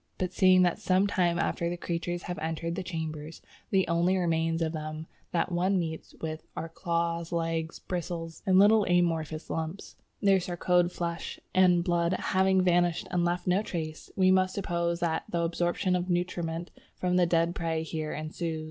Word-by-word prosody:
But 185 -1 -2
seeing 185 -1 +5
that 175 -1 +1
some 185 +1 +2
time 175 -4 +1
after 170 -1 0
the 175 - -3
creatures 175 +1 -3
have 180 -4 -5
entered 165 +1 -3
the 190 - -3
chambers, 160 -3 -5 0.3
the 190 -1 +2
only 170 +3 +2
remains 165 -1 +1
of 160 - -1
them 155 0 -5 0.3
that 175 +1 0
one 185 +3 +2
meets 160 -2 -4
with 155 0 -4 0.2
are 165 - -4
claws, 170 0 -2
legs, 165 -1 -2
bristles, 170 -2 -5
and 185 -1 +5
little 210 +2 +6
amorphous 165 -3 0
lumps, 160 +4 -4 0.2
their 195 -2 +4
sarcode 175 0 +1
flesh 170 -1 -4
and 180 -2 +5
blood 170 0 +1
having 190 0 +2
vanished 175 -1 +2
and 175 -1 +1
left 175 +1 0
no 185 +2 +3
trace, 160 -6 -5
we 185 -1 +4
must 185 0 +3
suppose 170 -3 -1
that 160 -2 0
the 170 - 0
absorption 175 +2 0
of 180 +1 -2
nutriment 175 -1 -2 0.2
from 180 0 0
the 175 -1 +4
dead 170 0 +2
prey 165 -2 -2
here 155 -1 -4
ensues...." 160 +1 -4
175 Hz, 175 wpm, -29 LUFS, 165-180 Hz, 0.3 s, little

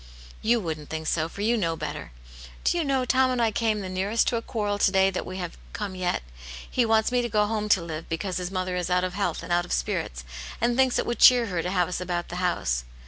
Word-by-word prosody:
" - - -19
You 240 - +5
wouldn't 160 -6 -5
think 160 0 -4
so, 160 +1 0
for 200 - -8
you 230 +3 +3
know 170 -7 0
better. 160 - -6 0.5
Do - - +2
you 340 - +1
know 270 -3 +1
Tom 260 +1 +3
and 250 -1 0
I 230 -2 +3
came 215 -1 0
the 190 - -5
nearest 195 +5 0
to 245 - -1
a 230 - -1
quarrel 205 -3 -2
to 195 - +4
day 190 0 +4
that 185 - -4
we 185 - -6
have 175 -3 -6
come 205 -3 -4
yet. 180 - -1 0.4
He 245 -2 +1
wants 220 +1 +3
me 250 0 +2
to 240 - -2
go 210 -1 +3
home 210 0 -2
to 190 -4 +4
live, 165 -1 -6
because 180 +3 -2
his 180 -1 -3
mother 185 -1 -2
is 180 -1 -2
out 180 0 +2
of 185 -1 -2
health 180 -4 -2
and 175 +1 -2
out 175 0 +3
of - - -10
spirits, - - -2 0.4
and 235 +1 +1
thinks 260 -1 +3
it - - 0
would 240 - -2
cheer 245 -2 +8
her 180 -6 -2
to 180 - -3
have 180 -2 +1
us 180 0 -3
about 175 -1 -3
the 175 - -5
house. 120 - 0
190 Hz, 270 wpm, -26 LUFS, 175-225 Hz, 0.5 s, cheer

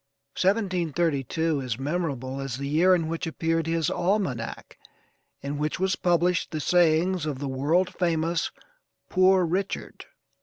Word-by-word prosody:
1732 165 - 0
is 125 -4 -3
memorable 135 -3 -3
as 135 -3 -4
the 140 0 -4
year 170 +6 +4
in 165 -3 -1
which 165 +1 -3
appeared 165 0 -1
his 165 -1 0
almanac 175 - -2 0.6
in 145 +1 -4
which 150 +2 -2
was 190 0 +1
published 175 0 +1
the 155 - -4
sayings 175 +1 +2
of 145 -3 -3
the 140 +1 -4
world 160 +8 +1
famous 165 -2 0 0.6
'Poor 185 -1 +4
Richard.' 185 +4 -3
165 Hz, 130 wpm, -26 LUFS, 145-180 Hz, 0.6 s, year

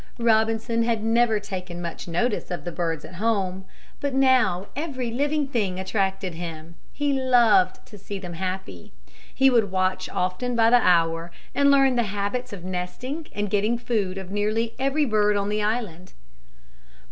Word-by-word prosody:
Robinson 225 0 +2
had 230 -2 0
never 225 -1 +3
taken 185 -4 -6
much 170 0 -6
notice 205 +7 -1
of 175 - -4
the 175 - -3
birds 165 -2 -3
at - - -11
home. 190 -4 0 0.3
But 285 -2 -2
now 255 -9 +3
every 260 -5 -3
living 290 +3 0
thing 205 -8 -1
attracted 190 -1 -1
him. 165 -1 -7 0.2
He 290 -1 0
loved 235 -8 +3
to 210 - -13
see 200 +1 -6
them 180 -2 -7
happy. 185 - -5 0.4
He 270 0 +4
would 225 -5 +3
watch 185 0 0
often 185 +7 -2
by 225 0 +4
the 245 0 +6
hour 165 -2 +2 0.2
and 280 0 +4
learn 270 -2 +4
the - - +4
habits 205 +5 -3
of 195 -4 -8
nesting 185 - -4
and 205 0 -1
getting 210 +4 +1
food 210 -6 -2
of 190 -1 -7
nearly 215 +3 0
every 275 +3 +1
bird 210 -3 +2
on 200 0 -1
the 210 0 0
island. 210 -5 -3
210 Hz, 165 wpm, -24 LUFS, 185-245 Hz, 0.4 s, the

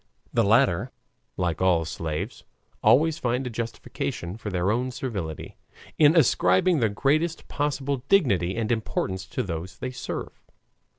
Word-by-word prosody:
The - - +3
latter, - - +3 0.5
like 85 -3 -1
all 90 -3 +3
slaves, 80 -1 -4 0.4
always 160 +4 +4
find 125 0 -1
a 125 - -4
justification 115 -5 -4
for 110 -1 -6
their 90 +1 0
own 125 +3 0
servility, 100 - -5 0.4
in 155 +1 +6
ascribing 175 +1 +4
the 115 -3 +2
greatest 155 +10 0
possible 140 -1 -1
dignity 100 - +3
and 115 -1 -1
importance 95 -4 -2
to - - -2
those 90 0 -5
they 130 - -4
serve. 125 - -6
115 Hz, 135 wpm, -25 LUFS, 90-140 Hz, 0.5 s, in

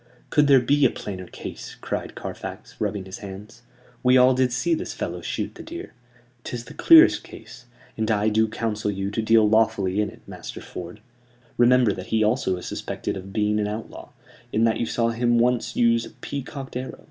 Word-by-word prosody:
"Could 150 -1 +4
there 135 -2 +7
be 145 +4 +2
a 130 - +6
plainer 95 -5 -7
case?" - - -8
cried - - -4
Carfax, - - -7
rubbing 100 -2 -2
his 95 0 -8
hands. 105 +4 -10 0.4
"We 125 +1 +5
all 130 +1 +6
did 130 -1 +2
see 125 +7 0
this 160 - -3
fellow - - -4
shoot - - -3
the - - -11
deer. 340 +2 -8 0.5
Tis 120 -1 -5
the 150 - -11
clearest 325 - +7
case; 125 -1 -13 0.3
and 110 0 -1
I 110 0 +2
do 110 +1 +2
counsel 110 -1 -2
you 95 0 -3
to 115 - -1
deal 110 -1 +4
lawfully 105 -3 +2
in 105 - -1
it, - - -16
Master - - -8
Ford. 90 +4 -9 0.5
Remember 120 -3 +4
that 95 -1 -8
he 110 -1 +2
also 105 -4 +1
is 90 - -8
suspected - - -4
of 95 0 -8
being 105 0 +1
an 105 - 0
outlaw, 105 +2 -7 0.4
in 110 - +1
that 115 -1 +2
you 115 - -1
saw 115 0 +1
him 120 +1 +1
once 120 0 +1
use 115 -1 +3
a - - -8
peacocked 135 -1 -7
arrow. 130 +1 -5
115 Hz, 195 wpm, -24 LUFS, 105-125 Hz, 0.5 s, there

